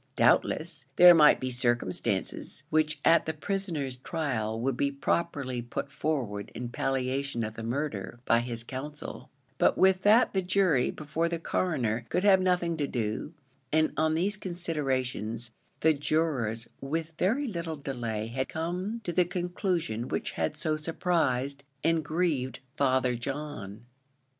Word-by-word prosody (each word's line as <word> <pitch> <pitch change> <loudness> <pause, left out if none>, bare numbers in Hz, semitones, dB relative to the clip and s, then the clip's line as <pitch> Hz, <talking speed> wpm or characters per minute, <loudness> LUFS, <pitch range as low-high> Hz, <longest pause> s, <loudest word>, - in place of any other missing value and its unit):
Doubtless, - - +2
there 175 0 +10
might 150 -3 +7
be 130 0 -2
circumstances, 120 -6 -1
which 155 0 +2
at 165 - +5
the 160 - -2
prisoner's 160 -7 -2
trial 125 -7 -2
would 130 +2 0
be 140 +2 +1
properly 140 -3 -1
put 120 +3 -5
forward 125 -10 -2
in 120 0 -4
palliation 130 0 -1
of 110 0 -4
the 115 - -7
murder, 120 -3 -3
by 115 - +4
his 120 -1 -4
counsel; 145 +5 -7 0.3
but - - +4
with 190 0 +4
that 215 +5 +5
the 190 - +2
jury 180 -7 +2
before 160 +2 -2
the 170 - -1
Coroner 125 -10 -1
could 180 - 0
have 195 -2 +6
nothing 180 -2 +1
to 145 -2 0
do; 115 +6 -3 0.4
and 155 0 +2
on 155 0 +2
these 195 +5 +1
considerations, 130 - -2 0.3
the 160 0 +5
jurors 140 -7 0
with 160 +4 -3
very 240 +11 +2
little 170 -6 -3
delay 120 -6 -3
had 130 +4 -3
come 180 +8 -3
to 175 - -3
the 180 - +4
conclusion 175 - -2
which - - -2
had 150 - -2
so 155 0 0
surprised 150 -4 0 0.2
and 165 -1 +2
grieved 150 -6 -1 0.2
Father 130 -2 +2
John. 120 -5 -5
145 Hz, 145 wpm, -29 LUFS, 125-170 Hz, 0.4 s, there